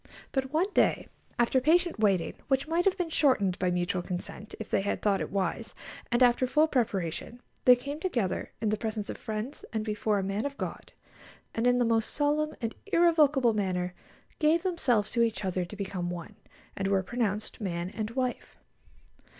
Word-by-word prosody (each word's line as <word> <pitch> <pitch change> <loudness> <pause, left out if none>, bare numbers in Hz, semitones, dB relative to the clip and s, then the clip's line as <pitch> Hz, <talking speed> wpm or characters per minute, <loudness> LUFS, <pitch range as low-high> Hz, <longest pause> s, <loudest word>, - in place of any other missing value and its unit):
But 265 -1 -1
one 360 +6 +1
day, - - +2 0.3
after 240 +2 +3
patient 340 0 +3
waiting, 195 -6 +2
which 270 +1 +1
might 335 +2 +1
have 390 -1 +3
been 350 -3 -2
shortened 205 - +2
by 180 - +1
mutual 180 0 0
consent, 185 +4 -5
if 220 - -5
they - - +3
had 200 - -1
thought 200 -2 +1
it - - -3
wise, 195 +3 -2 0.4
and 240 +1 +4
after 245 +1 +4
full 305 +5 +4
preparation, 220 - -1 0.3
they 250 - +9
came 280 +4 -6
together 240 - -1
in 220 - +1
the 215 - +1
presence 220 -2 -3
of - - -7
friends 220 +5 -5
and 220 -1 -2
before 210 -1 0
a 195 - 0
man 195 +3 -1
of 285 0 -4
God, - - -6 0.6
and 230 +2 +1
in 245 0 +4
the 245 - +3
most 225 -1 +2
solemn 300 +1 +1
and 230 -1 -2
irrevocable 310 - +4
manner 180 -3 -1 0.5
gave 320 +2 +3
themselves 255 - +1
to 235 - +1
each 225 -3 0
other 185 -1 -1
to 190 - -9
become 190 -3 -3
one, 175 -2 -7 0.4
and 195 - -1
were 195 -1 +2
pronounced 215 0 -2
man 175 -2 -3
and 215 0 -3
wife. 255 +1 -3
225 Hz, 185 wpm, -29 LUFS, 195-280 Hz, 0.6 s, they